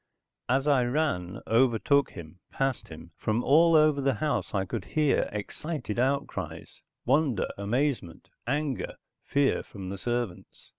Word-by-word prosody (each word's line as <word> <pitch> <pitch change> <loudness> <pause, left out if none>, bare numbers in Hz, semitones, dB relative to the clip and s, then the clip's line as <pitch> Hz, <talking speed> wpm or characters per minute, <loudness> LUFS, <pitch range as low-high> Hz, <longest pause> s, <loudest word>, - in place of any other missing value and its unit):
As 135 +2 +2
I 140 -4 +4
ran, 120 - -1
overtook 130 +4 +3
him, 85 0 -10
passed 135 -2 -1
him, 80 +1 -11
from 110 +3 0
all 165 +4 +5
over 155 -2 +5
the 135 -2 +1
house 150 +6 -1
I 95 -2 0
could 110 0 -4
hear 150 +5 +1
excited 120 +3 -4
outcries, 135 +3 -2 0.2
wonder, 135 -4 +2
amazement, 115 - -2 0.2
anger, 145 0 -1 0.3
fear 140 -1 +2
from 95 -3 -9
the 100 0 -5
servants. 120 -6 -4
125 Hz, 135 wpm, -28 LUFS, 100-145 Hz, 0.3 s, all